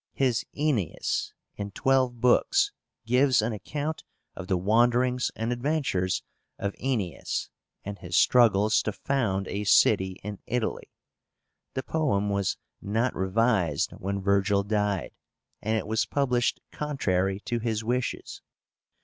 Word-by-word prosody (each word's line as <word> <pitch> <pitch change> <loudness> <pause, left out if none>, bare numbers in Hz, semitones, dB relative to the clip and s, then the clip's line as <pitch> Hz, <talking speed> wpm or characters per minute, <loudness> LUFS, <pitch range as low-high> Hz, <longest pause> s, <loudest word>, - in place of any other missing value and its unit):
His 125 -4 +1
Aenéis, 140 - 0 0.3
in 100 0 -4
twelve 130 +3 +1
books, 395 - +3 0.3
gives 125 +2 +4
an 115 +1 -1
account 145 - -4 0.3
of 95 - -7
the 95 -2 +1
wanderings 120 +6 +2
and 115 +2 -1
adventures 125 - 0 0.3
of 100 0 -2
Aenéas, 105 - -2 0.4
and 100 0 -6
his 90 -2 -2
struggles 110 -3 +5
to 110 - -3
found 100 -9 -1
a 105 - -3
city 95 -2 +4
in 105 0 -6
Italy. 120 -2 -2 0.9
The 130 - -2
poem 105 -11 0
was 100 -1 0 0.2
not 115 +5 0
revised 95 - +1
when 100 +1 -4
Virgil 100 0 +2
died, 105 -2 -1 0.5
and 110 +1 0
it - - -3
was 110 +1 0
published 125 -4 +1
contrary 95 -10 -1
to 120 +1 -2
his 110 -1 -2
wishes. 125 +2 -2
110 Hz, 125 wpm, -27 LUFS, 100-125 Hz, 0.9 s, struggles